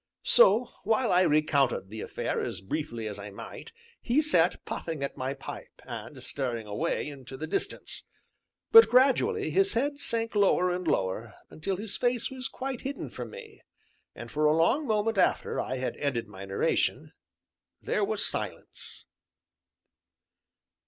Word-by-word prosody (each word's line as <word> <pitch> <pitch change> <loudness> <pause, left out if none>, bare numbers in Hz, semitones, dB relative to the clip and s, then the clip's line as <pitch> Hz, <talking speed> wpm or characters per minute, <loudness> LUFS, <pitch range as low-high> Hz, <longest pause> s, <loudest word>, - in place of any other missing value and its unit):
So, 250 - +5
while 225 +4 +2
I 180 0 +5
recounted 145 - +2
the 110 +1 -6
affair - - -2
as - - -4
briefly 115 0 -4
as 105 -1 -6
I 100 +1 -7
might, 100 - -9 0.3
he 245 +5 +2
sat 185 - +3
puffing 160 -4 -4
at 140 - -3
my 130 +2 -3
pipe, 135 - -9
and 120 +2 -8
staring 120 -6 -3
away 105 +6 -2
into 135 -2 -9
the 155 - -4
distance. 160 - -3 0.7
But 455 0 +10
gradually 280 - +3
his 390 +1 +3
head 285 +4 0
sank 230 -4 -2
lower 190 -3 +3
and 180 -1 -3
lower, 105 -2 -1 0.2
until 185 +5 -3
his 205 +2 -6
face 245 -1 0
was 260 0 -4
quite 265 -2 -5
hidden 275 +1 -5
from - - -6
me, 445 -3 -11 0.5
and - - -9
for 150 +1 +1
a 150 +1 +4
long 270 - +2
moment 215 -1 +1
after 180 - +2
I 130 - -3
had 130 - -3
ended 125 -6 -1
my 100 -1 -9
narration, 95 0 0 0.7
there - - -1
was - - -1
silence. - - -6
165 Hz, 150 wpm, -28 LUFS, -, 0.7 s, But